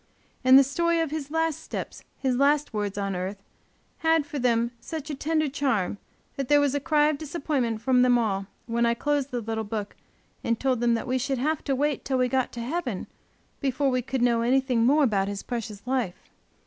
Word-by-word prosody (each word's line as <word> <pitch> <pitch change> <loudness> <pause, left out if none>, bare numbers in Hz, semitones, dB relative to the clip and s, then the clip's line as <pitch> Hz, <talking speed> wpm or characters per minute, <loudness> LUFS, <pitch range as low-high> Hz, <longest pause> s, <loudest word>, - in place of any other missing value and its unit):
And 260 +1 +8
the 275 - +8
story 335 +5 +1
of 325 -3 -1
his 300 -2 -4
last 325 -1 0
steps, - - -6
his 260 -2 0
last 285 +2 +2
words 205 -1 -2
on 195 -1 -2
earth, 190 +2 -4 0.6
had 325 -2 +3
for 295 -2 -5
them 235 -1 +2
such 310 +3 -6
a - - -3
tender 310 +2 0
charm, 250 -9 -1 0.4
that 275 -2 -2
there 290 +1 +5
was 285 -2 +2
a 285 - +1
cry 295 +2 +3
of 295 -2 -2
disappointment 280 -7 -2
from 255 -2 +4
them 250 -1 +5
all, 200 -4 -1 0.2
when 235 0 0
I 235 - +2
closed 285 +2 0
the 245 -2 -3
little 220 0 -3
book 210 -1 -5 0.5
and 230 -1 0
told 260 -3 +1
them 235 0 +3
we 255 0 0
should 270 +1 -1
have 305 +5 -1
to 275 - +1
wait 290 +1 0
till 265 -1 0
we 255 0 +2
got 260 -1 0
to 235 - -5
heaven 250 - -3 0.5
before 275 0 +1
we 255 0 +1
could 255 0 -2
know 235 -1 +3
anything 250 -1 +2
more 295 +3 +4
about 200 -6 +2
his 200 0 -4
precious 225 -3 -5
life. 250 -8 -2
260 Hz, 210 wpm, -26 LUFS, 230-290 Hz, 0.6 s, And